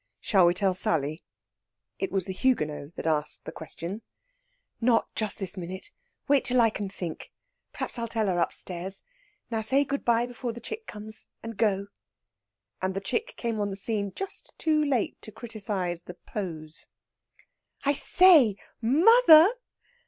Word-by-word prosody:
"Shall 190 -4 +4
we 175 - +2
tell 190 0 +2
Sally?" 155 -3 -1 0.8
It 385 - -2
was 190 -2 +1
the 190 - -4
Huguenot 155 - -1
that - - -6
asked 155 -2 -1
the - - -6
question. 170 +6 -6 0.8
"Not 230 -1 +2
just 215 -2 -2
this 195 0 0
minute. 185 +2 -6 0.4
Wait 280 -1 +4
till 250 0 +4
I 225 -2 +5
can 200 -2 -4
think. 175 -4 -7 0.4
Perhaps - - -4
I'll 230 - -2
tell 225 -1 0
her 180 -3 0
upstairs. 180 +2 -3 0.5
Now 225 -1 0
say 265 +6 +3
good 280 -1 -3
bye 235 0 +3
before 245 -1 -5
the 235 - -9
chick 445 - -7
comes, 215 +1 -6 0.2
and 230 0 -6
go." 200 -2 +1 1.0
And 190 0 -1
the - - 0
chick 445 - -3
came 230 -2 -2
on 205 -1 0
the 195 - -5
scene 200 0 -1
just 390 0 -4
too 310 -1 +2
late 270 -6 -1
to 215 - -8
criticise 200 -6 -4
the 180 - -10
pose. 165 -6 -7 1.0
"I 285 - +3
say, 305 - +6 0.3
mother!" 330 - +7
215 Hz, 160 wpm, -27 LUFS, 185-250 Hz, 1.0 s, mother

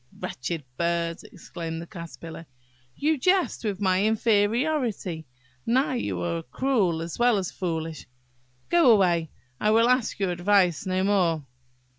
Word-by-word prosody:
" - - -19
"Wretched 150 +5 -4
bird!" 170 0 -1
exclaimed 165 -2 -6
the 170 - -7
Caterpillar, 165 -1 -9 0.5
"you 305 0 +1
jest 365 +1 +1
with 205 -3 -2
my 190 -1 +2
inferiority–now 215 - 0
you 100 - -2
are 85 -1 -2
cruel 185 - 0
as 165 +5 -7
well 240 -2 +4
as 185 -3 -2
foolish. 165 -3 -4 0.6
Go 345 -6 +5
away! 175 -7 +4 0.3
I 210 - +2
will 225 +2 +5
ask 250 -2 +1
your 195 -3 0
advice 180 -2 +2
no 185 0 0
more." 175 -7 +1
185 Hz, 135 wpm, -26 LUFS, 165-225 Hz, 0.6 s, Go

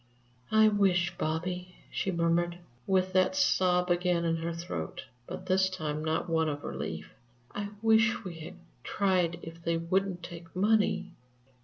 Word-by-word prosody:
"I 220 0 +6
wish, 185 -4 +2
Bobby," 180 +3 -3 0.2
she - - -1
murmured, 170 0 +1 0.3
with 185 -1 +2
that 185 +8 +3
sob 180 -10 +3
again 175 -1 +2
in 165 0 +1
her 165 +1 -3
throat, 165 - -5 0.2
but - - -7
this 190 0 +3
time 155 -5 -3
not 160 +2 0
one 160 -1 +2
of 145 -1 -4
relief, - - -5 0.4
"I 205 0 -3
wish 225 +1 +4
we 175 -4 -7
had 155 - -8 0.3
tried 185 -4 +1
if 165 +1 -9
they 170 0 +1
wouldn't 180 +2 -1
take 170 -1 -10
money!" 205 -1 +2
180 Hz, 150 wpm, -30 LUFS, 165-190 Hz, 0.4 s, I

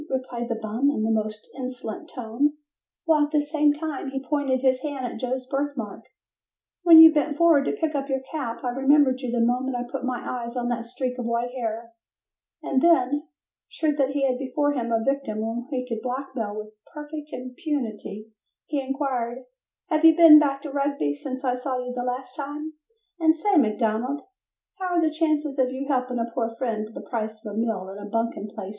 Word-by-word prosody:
replied 255 -2 -3
the 230 - -1
bum 225 +6 0
in 220 -7 0
a 225 - +1
most 215 -1 -2
insolent 255 -4 -6
tone 250 +5 -1 0.5
while 305 -2 +4
at - - -18
the 300 -1 +3
same 295 0 +2
time 295 -2 -4
he 270 0 -4
pointed 280 -3 +1
his 260 -1 +2
hand 280 -3 -4
at 245 - -5
Joe's 255 0 -2
birthmark. 275 -5 -3 0.8
"When 340 -2 +9
you 320 0 +11
bent 295 -1 0
forward 330 -5 +5
to - - 0
pick 320 -6 -1
up 280 -1 -2
your 265 -1 0
cap 250 -7 -4
I 250 - 0
remembered 270 0 +3
you 250 -3 -3
the 235 -1 +2
moment 250 +2 0
I 245 - -2
put 245 +1 -6
my 255 -1 -1
eyes 240 0 -4
on 240 0 -1
that 235 -1 -2
streak 250 +1 -4
of 245 - -3
white 235 +1 -1
hair," 230 -2 -4 0.7
and 260 - +1
then, 290 -2 +3 0.4
sure 310 -2 0
that 275 -2 +2
he 285 -1 0
had 255 -1 -1
before 275 +2 0
him 235 -4 -2
a 225 -1 +1
victim 275 -4 -1
whom 225 +3 -3
he 255 -3 -3
could 230 -2 -4
blackmail 250 -4 -4
with 215 0 -7 0.2
perfect 300 0 -7
impunity, 250 - -5 0.3
he 295 -2 -1
inquired, 260 -3 -2 0.4
"Have 310 -2 +1
you 325 -1 +8
been 320 -2 +10
back 280 -2 0
to 295 - -5
Rugby 280 - 0
since 260 - -6
I 250 - +2
saw 255 +1 -2
you 250 0 -4
the 245 - -3
last 250 +1 -4
time, 295 +2 -5 0.5
and 320 -1 +4
say, 410 +3 +1
McDonald, 235 +1 +1 0.6
how 365 -2 -1
are - - +4
the 315 -1 +2
chances 305 -3 0
for 260 -1 +2
your 265 +2 -5
helping 255 -3 0
a 230 - 0
poor 230 -2 -2
friend 225 -4 -2
to - - -15
the - - -9
price 220 -2 -3
of 210 - -5
a - - -6
meal 220 -4 -1
and 195 +1 -8
a 205 0 -8
bunking 230 -1 -2
place - - -11
for - - -7
the 190 - -5
night?" - - -7
260 Hz, 215 wpm, -25 LUFS, 235-290 Hz, 0.8 s, you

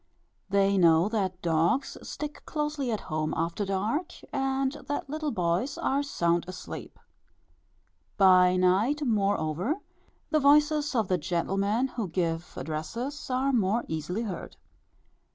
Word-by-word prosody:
They 195 0 +3
know 165 +1 +5
that 190 -5 -2
dogs 170 - +1
stick 300 0 -6
closely 300 -3 -2
at 215 - -2
home 155 0 -2
after 170 +5 -1
dark, 210 - -1 0.2
and 270 0 0 0.2
that 290 -1 -2
little 305 +1 -2
boys 185 +5 0
are 275 +1 +1
sound 170 -12 0
asleep. 185 0 -8 1.2
By 185 -2 +6
night, 200 +11 +2
moreover, 200 - +1 0.6
the 310 - +4
voices 295 0 +4
of 220 -4 +2
the 185 -1 +1
gentlemen 195 - 0
who 230 -6 -3
give 165 -1 -2
addresses 195 - -4
are 260 +2 +1
more 220 0 +1
easily 160 +8 -3
heard. 195 -6 -6
200 Hz, 125 wpm, -28 LUFS, 175-270 Hz, 1.2 s, By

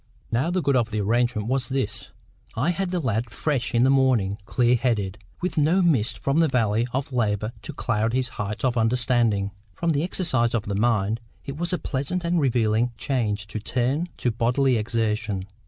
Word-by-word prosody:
Now 125 +8 +1
the 180 -1 0
good 140 -1 +2
of 120 -3 +2
the 110 -1 -2
arrangement 115 +1 +1
was 130 -1 -1
this: 130 -6 -2 0.5
I 140 +10 +1
had 185 +2 -2
the 180 0 -1
lad 115 -4 -1
fresh 130 +1 -1
in 120 - +4
the 130 - +5
morning, 125 -8 +2
clear 120 -1 +3
headed, 105 -6 -1 0.2
with 180 -2 -1
no 170 +6 +3
mists 135 -10 +2
from 140 +3 0
the 165 - +5
valley 115 -3 +1
of 135 +2 -3
labour 105 -2 0
to - - -7
cloud 115 -5 -1
the 130 - +2
heights 105 -2 -3
of 125 -1 +1
understanding. 115 -3 +2 0.2
From 165 - -1
the 145 -2 +1
exercise 135 -10 +1
of 110 - -1
the 100 - -3
mind 110 0 +1 0.3
it 140 - -5
was 175 +4 -1
a 180 - +1
pleasant 150 +6 -2
and 170 0 +1
relieving 120 -3 +1
change 110 -7 -1
to 110 +1 -5
turn 130 +10 -1
to 120 - 0
bodily 125 +4 +2
exertion. 110 -3 -1
120 Hz, 190 wpm, -24 LUFS, 110-140 Hz, 0.5 s, the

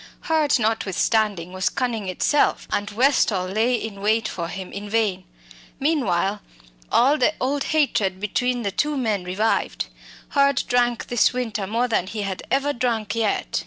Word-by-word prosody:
Hurd, 310 -3 +2
notwithstanding, 215 -4 0
was 185 +1 0
cunning 230 -6 -2
itself, 285 - +1
and 205 0 -1
Westall 220 -5 +2
lay 220 +6 +1
in 215 -4 -5
wait 220 +2 +2
for 170 -1 -4
him 190 +1 -7
in 205 +1 -7
vain. 200 -4 0 0.5
Meanwhile, 210 - +1 0.5
all 280 +5 +4
the 310 - +2
old 275 +2 -1
hatred 220 - +1
between 245 +4 -1
the 200 - -1
two 295 +8 0
men 215 -7 0
revived. 195 +5 -1 0.4
Hurd 280 -2 +3
drank 245 -1 +1
this 240 0 +2
winter 225 -5 -3
more 230 +4 0
than 200 -6 0
he 210 +1 -4
had 195 -2 -4
ever 280 +2 +1
drunk 235 -4 -1
yet. 225 -3 0
225 Hz, 155 wpm, -23 LUFS, 200-250 Hz, 0.5 s, all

